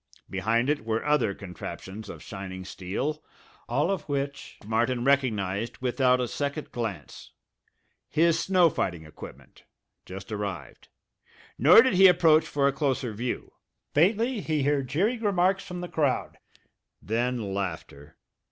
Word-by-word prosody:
Behind 115 +6 +1
it 145 -4 0
were 110 +2 -2
other 150 -9 +2
contraptions 95 +2 -8
of - - -9
shining 95 -2 -7
steel, 115 +13 -4 0.5
all 150 +7 +1
of 195 -4 -1
which 140 0 -3
Martin 120 +3 0
recognized 115 -6 0
without 125 0 +2
a 125 - 0
second 145 +4 -4
glance 105 - -6 0.8
his 165 +1 +3
snow 185 -2 +4
fighting 85 -9 -3
equipment, 75 - -13 0.4
just 95 +4 -9
arrived. 105 -2 -5 0.7
Nor 170 - +8
did 260 - +2
he 190 +1 +8
approach 165 -3 +5
for 140 -1 +1
a 140 - +1
closer 135 -4 -1
view. 120 +4 -4 0.4
Faintly 220 - +2
he 155 -4 -1
heard 140 -1 +1
jeering 200 - 0
remarks 195 -2 +2
from 180 0 -7
the 175 - -4
crowd; 145 -6 -1 0.6
then 115 0 -2
laughter. 80 -7 -5
130 Hz, 135 wpm, -27 LUFS, 105-155 Hz, 0.8 s, Nor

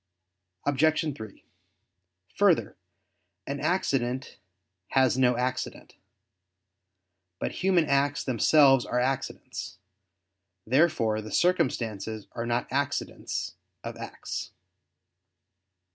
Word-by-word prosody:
Obj. 155 +2 +2
3: 110 -4 -10 0.9
Further, - - +3 0.7
an 140 +1 -4
accident 135 -6 -1 0.5
has 130 -2 +3
no 125 -2 +3
accident. 125 +1 -3 1.4
But - - -3
human 185 -3 +3
acts 140 0 +1
themselves 135 +1 +5
are 125 - -1
accidents. 130 -6 -3 0.9
Therefore 115 -5 +2
the 110 - -9
circumstances 110 - 0
are 115 0 -4
not 120 +1 0
accidents - - -2 0.3
of - - -5
acts. - - -6
130 Hz, 85 wpm, -27 LUFS, 120-145 Hz, 1.4 s, themselves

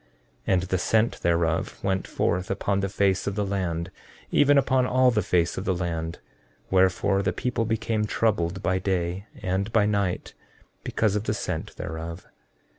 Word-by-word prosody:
14:23 - - +3
And 90 - +3
the 95 0 0
scent 110 +5 +1
thereof 85 +1 0
went 95 -1 0
forth 90 +2 -1
upon 100 0 0
the 100 0 -1
face 95 -1 +1
of 100 - -1
the 105 -1 0
land, 90 -3 -2 0.4
even 145 0 +5
upon 130 -2 +3
all 130 0 +4
the 105 - +1
face 85 -2 +1
of 95 - -6
the 95 - +1
land; 85 -2 -3 0.5
wherefore 95 +1 +3
the 95 -2 +1
people 115 +4 -1
became 110 -1 0
troubled 100 -4 0
by 95 0 +1
day 95 +1 -2 0.2
and 95 +3 -1
by 110 -2 +4
night, 100 -3 -1 0.5
because 105 -2 0
of 105 +1 -1
the - - 0
scent - - -4
thereof. 80 +3 -6
95 Hz, 170 wpm, -26 LUFS, 90-105 Hz, 0.5 s, even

